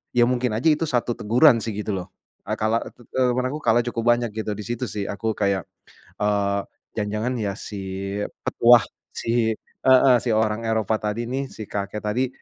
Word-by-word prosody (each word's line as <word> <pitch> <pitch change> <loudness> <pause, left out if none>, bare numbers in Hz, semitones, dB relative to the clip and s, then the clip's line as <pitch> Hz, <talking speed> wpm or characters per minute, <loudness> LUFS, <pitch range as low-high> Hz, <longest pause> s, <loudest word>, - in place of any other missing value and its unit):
ya 120 - +6
mungkin 125 -2 0
aja 115 - -3
itu 155 +1 0
satu 120 -3 0
teguran 120 +4 +5
sih 110 -3 -4
gitu 105 +1 -3
loh. 90 - -7 0.4
Eee - - -1
kalah 110 +2 +1
eee, - - -9
tet 120 - -18
temen 125 -1 +1
aku 150 - -4
kalah 120 +2 +3
cukup 115 -1 -3
banyak 120 -3 -3
gitu 110 -1 -3
di 105 - -6
situ 120 +1 -3
sih 100 +1 -3
aku 110 +2 -2
kayak, 100 -4 0 0.5
eee, 100 -1 +1 0.3
jangan-jangan 105 +3 -2
ya 100 -2 -2
si 105 - -7 0.7
petuah 120 0 +6 0.3
si 115 -1 +1
heeh 130 -1 +4
si - - -3
orang 110 0 +1
Eropa 110 -1 0
tadi 105 +3 -2
nih, 135 +2 -3
si 110 - -8
kakek 100 +1 -4
tadi, 125 +5 0
110 Hz, 190 wpm, -23 LUFS, 105-120 Hz, 0.7 s, ya